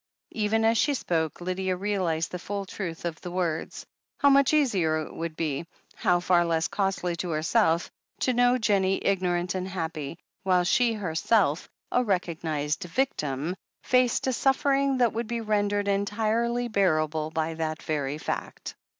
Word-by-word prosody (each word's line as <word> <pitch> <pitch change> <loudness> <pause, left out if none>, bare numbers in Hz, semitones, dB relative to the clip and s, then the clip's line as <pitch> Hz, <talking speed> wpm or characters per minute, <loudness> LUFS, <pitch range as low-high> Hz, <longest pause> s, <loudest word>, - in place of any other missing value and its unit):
Even 220 +1 +1
as 225 0 +3
she 290 -1 +2
spoke 165 - -1
Lydia 185 +1 -1
realized 180 -4 -1
the 180 - -4
full 200 +2 -4
truth 175 -4 -6
of 165 -2 -4
the 180 - -6
words. 175 -3 -3 0.3
How 280 - +5
much 275 0 +5
easier 200 - +2
it - - -10
would 165 -1 -5
be, 160 0 -2 0.3
how 175 - +2
far 175 -1 +3
less 165 -1 +1
costly 190 -3 -1
to 175 +1 -3
herself, 165 +2 +1 0.3
to 255 - +2
know 245 +1 +4
Jennie 195 -5 +1
ignorant 180 -2 +1
and 185 0 -3
happy, 165 -4 -4 0.2
while 185 -2 +3
she 235 +5 +3
herself, 180 -3 +1 0.2
a 250 - +3
recognized 160 -7 -1
victim, 165 - -1 0.3
faced 250 -2 +2
a 260 - +1
suffering 275 +1 +2
that 240 -3 +3
would 230 +1 -3
be 235 0 -2
rendered 205 -1 0
entirely 220 +4 0
bearable 155 -7 +1
by 160 0 -2
that 160 -1 -3
very 145 -2 -2
fact. - - -5
185 Hz, 155 wpm, -27 LUFS, 165-225 Hz, 0.3 s, How